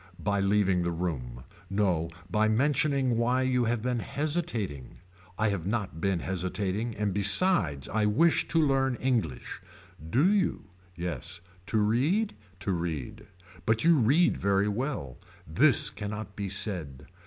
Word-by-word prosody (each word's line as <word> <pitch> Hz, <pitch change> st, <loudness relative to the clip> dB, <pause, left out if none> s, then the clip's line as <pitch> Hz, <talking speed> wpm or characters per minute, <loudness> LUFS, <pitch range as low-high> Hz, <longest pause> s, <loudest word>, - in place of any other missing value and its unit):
By 100 Hz, 0 st, -1 dB
leaving 95 Hz, -2 st, +2 dB
the 85 Hz, -, -1 dB
room. 65 Hz, -9 st, -4 dB, 0.3 s
No 95 Hz, -5 st, 0 dB, 0.2 s
by 105 Hz, +4 st, +1 dB
mentioning 135 Hz, +1 st, +1 dB
why 125 Hz, +2 st, +1 dB
you 125 Hz, -2 st, +1 dB
have 115 Hz, -1 st, -1 dB
been 125 Hz, -1 st, -1 dB
hesitating. 125 Hz, -, -3 dB, 0.4 s
I 110 Hz, 0 st, +1 dB
have 95 Hz, -4 st, -3 dB
not 100 Hz, -7 st, -3 dB
been 95 Hz, -3 st, 0 dB
hesitating 95 Hz, +4 st, -2 dB
and 105 Hz, -2 st, -1 dB
besides 100 Hz, -, +4 dB
I 105 Hz, -1 st, 0 dB
wish 160 Hz, +11 st, +3 dB
to 165 Hz, -, +1 dB
learn 135 Hz, -4 st, +2 dB
English. 115 Hz, -, -2 dB, 0.5 s
Do 130 Hz, -, +3 dB
you. 190 Hz, -, -1 dB, 0.2 s
Yes. 85 Hz, -1 st, -4 dB, 0.3 s
To 110 Hz, -, 0 dB
read. 135 Hz, -, +1 dB, 0.3 s
To 100 Hz, -, -1 dB
read. 85 Hz, -7 st, -4 dB, 0.4 s
But 110 Hz, 0 st, +2 dB
you 170 Hz, +1 st, +5 dB
read 145 Hz, +7 st, +3 dB
very 100 Hz, 0 st, +1 dB
well. 105 Hz, -, -3 dB, 0.3 s
This 125 Hz, -, +3 dB
cannot 105 Hz, 0 st, -6 dB
be 100 Hz, -1 st, -4 dB
said. 90 Hz, -, -2 dB
105 Hz, 140 wpm, -28 LUFS, 90-130 Hz, 0.5 s, you